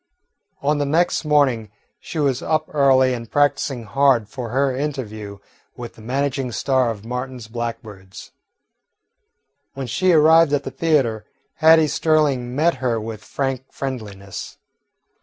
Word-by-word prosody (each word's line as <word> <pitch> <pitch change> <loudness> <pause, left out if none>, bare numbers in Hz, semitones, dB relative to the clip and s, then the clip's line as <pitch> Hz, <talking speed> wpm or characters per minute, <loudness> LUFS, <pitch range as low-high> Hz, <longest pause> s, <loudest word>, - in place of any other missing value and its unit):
On 145 +1 +1
the 145 - 0
next 165 +3 +1
morning 135 -8 +2 0.3
she - - -8
was 140 -4 +1
up 155 -1 0
early 130 -3 +4
and 115 -2 -6
practising 140 -3 +1
hard 120 0 +2
for 120 +1 -6
her 135 +2 +1
interview 110 -8 -5 0.4
with 120 -2 -8
the - - -16
managing 135 +2 -2
star 130 0 +1
of 110 -2 -6
"Martin's 125 -1 -5
Blackbirds." 110 -5 -7 1.4
When 135 -1 -4
she 185 +10 +1
arrived 160 -1 +5
at 145 - +1
the - - -6
theatre, 135 -10 0 0.3
Hattie 160 0 +6
Sterling 145 -6 +1
met 160 +1 +2
her 120 -3 -1
with 110 -1 -7
frank 135 -1 -4
friendliness. 105 -8 -7
130 Hz, 135 wpm, -21 LUFS, 115-145 Hz, 1.4 s, Hattie